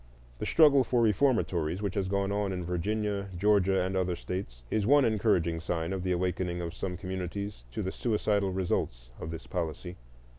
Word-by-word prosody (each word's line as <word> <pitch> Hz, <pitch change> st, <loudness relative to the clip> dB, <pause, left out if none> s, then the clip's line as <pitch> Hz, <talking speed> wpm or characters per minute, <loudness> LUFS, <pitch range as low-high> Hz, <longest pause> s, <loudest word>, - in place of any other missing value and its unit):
The -, -, -3 dB
struggle 145 Hz, -4 st, +6 dB
for 125 Hz, -1 st, +1 dB
reformatories, 100 Hz, -, +2 dB
which 100 Hz, -3 st, -2 dB
has 100 Hz, -2 st, -1 dB
gone 100 Hz, 0 st, 0 dB
on 100 Hz, -1 st, 0 dB
in 90 Hz, -2 st, -3 dB
Virginia, 100 Hz, +3 st, -1 dB
Georgia, 95 Hz, -1 st, +3 dB
and 95 Hz, +1 st, -2 dB
other 90 Hz, -1 st, 0 dB
States, 85 Hz, -11 st, -6 dB
is 110 Hz, -, +2 dB
the 100 Hz, -, -1 dB
one 145 Hz, 0 st, +6 dB
encouraging 95 Hz, -7 st, +2 dB
sign 85 Hz, +1 st, -2 dB
of 95 Hz, -, -3 dB
the 90 Hz, 0 st, -1 dB
awakening 90 Hz, 0 st, -1 dB
of 85 Hz, -1 st, -4 dB
some 90 Hz, 0 st, -4 dB
communities 95 Hz, -3 st, -5 dB
to -, -, -3 dB
the 95 Hz, -, -2 dB
suicidal 105 Hz, -4 st, 0 dB
results -, -, -2 dB
of 80 Hz, -, -5 dB
this 80 Hz, 0 st, -7 dB
policy. 90 Hz, +1 st, -4 dB
95 Hz, 185 wpm, -29 LUFS, 90-105 Hz, -, struggle